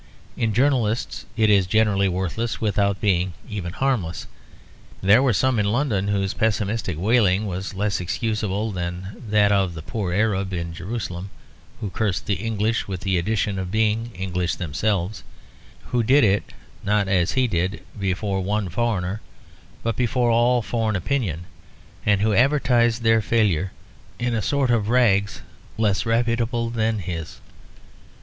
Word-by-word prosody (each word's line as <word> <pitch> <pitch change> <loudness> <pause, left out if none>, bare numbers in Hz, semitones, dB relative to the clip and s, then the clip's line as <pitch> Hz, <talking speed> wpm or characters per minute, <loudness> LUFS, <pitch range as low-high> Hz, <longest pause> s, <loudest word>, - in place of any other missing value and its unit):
In 115 -2 0
journalists 120 -2 0
it 110 -2 +4
is 100 -3 +4
generally 100 -1 +2
worthless 95 +6 -2
without 100 -2 +1
being 90 -2 +1
even 100 -6 -4
harmless. 100 - -1 0.7
There 100 +6 +5
were 135 -2 +3
some 120 +3 +2
in 105 - +1
London 115 -6 0
whose 100 -1 0
pessimistic 105 -4 -1
wailing 105 0 +3
was 95 0 -4
less 100 -1 -1
excusable 105 +2 -2
than 90 0 -4 0.2
that 105 -1 +4
of 95 -4 +1
the 80 - -7
poor 100 -2 -3
Arab 100 -1 0
in 85 -1 -3
Jerusalem; 90 0 -5 0.5
who 100 - -4
cursed 100 -4 -1
the 105 - 0
English 115 0 0
with 95 -2 -5
the 95 -2 +1
addition 100 +1 -1
of 95 -1 -4
being 110 +2 +1
English 90 -1 -2
themselves, 95 +4 -1 0.7
who 125 - +1
did 130 +5 +4
it, 100 -1 +2 0.3
not 105 -1 +1
as 95 -2 +2
he 130 -1 +2
did, 95 -2 -1 0.2
before 95 0 -1
one 100 0 -1
foreigner, 100 -1 -1 0.6
but 115 -2 -1
before 120 0 +1
all 120 +1 +3
foreign 110 -2 -1
opinion; 95 - -2 0.6
and 100 -1 +3
who 110 0 +2
advertised 120 -2 +3
their 115 0 +4
failure 95 -6 +1 0.5
in 120 0 -1
a 110 - 0
sort 135 +1 +1
of 110 -3 +1
rags 100 -5 +2 0.3
less 105 -1 +1
reputable 115 0 0
than 110 -1 0
his. 85 -4 -5
105 Hz, 145 wpm, -23 LUFS, 95-115 Hz, 0.7 s, There